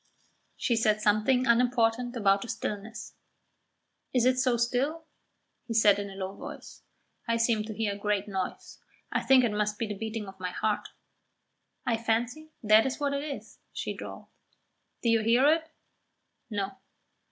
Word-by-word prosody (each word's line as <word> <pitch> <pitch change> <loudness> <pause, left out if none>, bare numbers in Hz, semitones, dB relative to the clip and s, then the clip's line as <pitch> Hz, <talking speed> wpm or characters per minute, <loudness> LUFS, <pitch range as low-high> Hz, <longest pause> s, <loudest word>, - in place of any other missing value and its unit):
She 240 - +1
said 215 -2 +2
something 215 +5 +3
unimportant 240 0 +2
about 200 -3 +3
the - - -6
stillness. 215 +1 -5 1.0
"Is 245 -1 +4
it 255 0 +3
so 255 -2 +2
still?" 260 +7 0 0.6
he 230 - -3
said 205 -2 +5
in 200 0 -4
a 195 - -10
low 190 0 -4
voice. - - -10 0.5
"I 230 0 +2
seem 230 -2 +2
to 215 - -6
hear 215 -2 0
a - - -7
great 205 -1 0
noise. 190 -2 -5 0.3
I - - +1
think 265 -1 +5
it 235 - +2
must 210 0 -1
be 230 - -1
the 210 - -4
beating 220 0 -4
of 190 0 -11
my 180 -1 -3
heart." 215 +2 -1 1.0
"I 235 -2 +1
fancy 235 +7 -1
that 215 +2 +6
is 265 - -4
what 285 -1 0
it 280 0 -2
is," 290 -2 -7
she - - -3
drawled. - - -8 0.8
"Do 235 - +2
you 230 -1 +4
hear 235 +4 +4
it?" 320 0 -3 0.8
"No." 200 -3 -2
225 Hz, 165 wpm, -29 LUFS, 210-245 Hz, 1.0 s, that